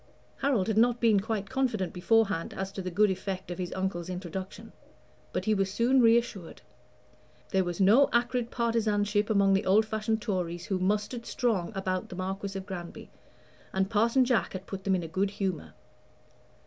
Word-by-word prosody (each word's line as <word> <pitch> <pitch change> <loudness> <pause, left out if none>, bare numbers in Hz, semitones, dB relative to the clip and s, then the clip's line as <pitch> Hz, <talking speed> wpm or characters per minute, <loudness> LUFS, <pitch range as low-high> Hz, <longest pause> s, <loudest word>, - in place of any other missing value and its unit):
Harold 265 -9 +1
had 220 -1 +2
not 240 +1 +3
been 220 -4 +4
quite 205 -1 -3
confident 235 -9 -1
beforehand 195 -1 +1
as 190 0 -4
to 195 - -5
the 185 - -4
good 200 +3 +3
effect 190 0 -4
of 175 - -6
his 180 -1 -3
uncle's 185 -2 -3
introduction; 185 +1 -6 0.6
but - - -3
he 215 - +3
was 195 -2 0
soon 245 +5 +3
reassured. 230 -6 +1 0.9
There 190 -3 +2
was 175 0 -4
no 220 +9 +5
acrid 240 0 0
partisanship 210 -3 0
among 200 -2 +4
the 195 +1 +1
old 210 +4 +5
fashioned 220 0 -1
Tories 175 -5 -3
who 190 -2 -1
mustered 210 +5 -1
strong 220 -7 0
about 185 -1 -2
the - - -7
Marquis 195 +1 -4
of 190 - -6
Granby, 175 -3 -8 0.6
and 190 +2 0
Parson 230 +4 +3
Jack 240 -4 +1
had 190 0 -6
put 195 -1 -7
them 195 -1 +3
in 180 - -2
a - - -5
good 190 +5 0
humor. 185 - -4
195 Hz, 175 wpm, -28 LUFS, 185-225 Hz, 0.9 s, no